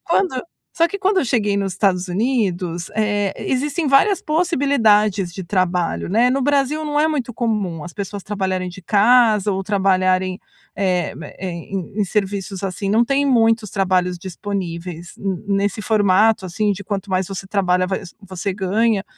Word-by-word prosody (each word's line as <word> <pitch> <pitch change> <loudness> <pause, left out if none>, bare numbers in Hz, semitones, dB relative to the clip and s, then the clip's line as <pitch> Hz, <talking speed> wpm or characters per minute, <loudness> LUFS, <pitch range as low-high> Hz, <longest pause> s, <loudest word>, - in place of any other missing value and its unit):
Quando 340 -6 +1 0.4
só 335 - +4
que 400 - -4
quando 390 +1 +1
eu - - -1
cheguei 210 -5 +1
nos 195 -1 -1
Estados 190 -2 +1
Unidos, 185 -5 -1
eh, 205 -2 +1
existem 290 +4 -1
várias 295 +8 +4
possibilidades 225 - +2
de 190 - -5
trabalho, 180 -2 0
né? 235 +5 +4
No 270 +2 +1
Brasil 285 +2 +1
não 295 -1 0
é 310 - +3
muito 260 -6 -2
comum 205 -9 -2
as 175 - -8
pessoas 200 0 -6
trabalharem 190 -3 -2
de 180 +2 -10
casa 215 +1 +4
ou 190 - -1
trabalharem, 185 -2 +1 0.4
eh, 180 -4 0
ma - - -8
em 180 -1 -6 0.3
em - - +2
em - - +3
serviços 195 -1 -2
assim, 195 +1 -3
não 225 +3 +4
tem 275 +3 +1
muitos 225 -5 +3
trabalhos 185 -2 +1
disponíveis 175 -2 -6
n 195 -1 -3
nesse 200 +1 0
formato, 205 0 +3
assim, 210 +4 0
de 200 +1 -7
quanto 200 0 -4
mais 185 0 +1
você 195 -1 -5
trabalha, 185 -2 +1
va 190 +1 -1 0.3
você 190 0 -4
ganha. 205 +2 +1
200 Hz, 165 wpm, -20 LUFS, 185-230 Hz, 0.4 s, só